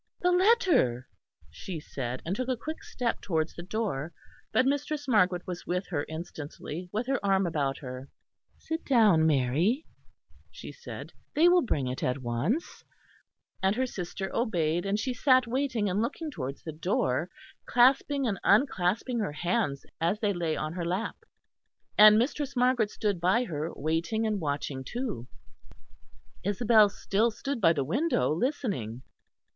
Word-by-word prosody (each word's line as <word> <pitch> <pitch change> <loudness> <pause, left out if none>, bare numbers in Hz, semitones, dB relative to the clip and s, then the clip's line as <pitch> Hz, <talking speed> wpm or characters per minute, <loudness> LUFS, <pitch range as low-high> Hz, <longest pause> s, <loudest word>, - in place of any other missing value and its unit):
"The 360 - +3
letter!" 360 - +3 0.4
she 180 -4 -6
said; 130 -4 -5
and 175 +4 -1
took 255 +3 -3
a 255 -2 0
quick 315 +7 -6
step 245 -2 -2
towards 160 -3 -1
the - - -8
door; 180 -6 -3 0.4
but 255 - +3
Mistress 290 +1 -1
Margaret 185 -7 +3
was 180 -1 -6
with 180 +2 -1
her 145 -5 -2
instantly, 160 +1 -7
with 220 +4 -2
her 270 -2 -1
arm 195 -1 +3
about 140 -5 -1
her. 130 0 -7 0.5
"Sit 320 +1 -4
down, 210 - +4
Mary," 155 - +2 0.6
she - - -9
said, 480 - -9 0.2
"they 325 +3 +6
will 355 0 +6
bring 150 - -1
it 125 +1 -4
at 125 - 0
once"; 135 - -2 0.8
and 190 +2 +2
her 260 +2 +1
sister 190 -3 -5
obeyed; 175 -6 0
and 200 +1 +1
she 255 +4 -2
sat 255 0 +4
waiting 245 -3 -1
and 195 +2 0
looking 300 +6 -3
towards 135 - -6
the 160 - -5
door, 155 -2 0 0.4
clasping 270 +3 +3
and 205 -5 -1
unclasping 220 +1 +2
her 205 -9 -2
hands 170 -3 -1 0.2
as 175 +6 +1
they 210 -2 +1
lay 170 -3 -1
on 155 +1 -3
her 175 -1 -3
lap; 185 +6 -2 0.8
and 210 0 +9
Mistress 280 +4 -1
Margaret 245 -3 +3
stood 205 -5 -2
by 190 +8 +3
her, 160 -6 -4
waiting 165 +9 -1
and 210 -3 -1
watching 145 -2 -3
too. 225 - -4 1.2
Isabel 210 +2 +4
still 205 +3 +1
stood 275 +2 -4
by 165 -3 +6
the 145 -4 0
window 180 - +1
listening. 170 - -2
195 Hz, 155 wpm, -28 LUFS, 160-245 Hz, 1.2 s, and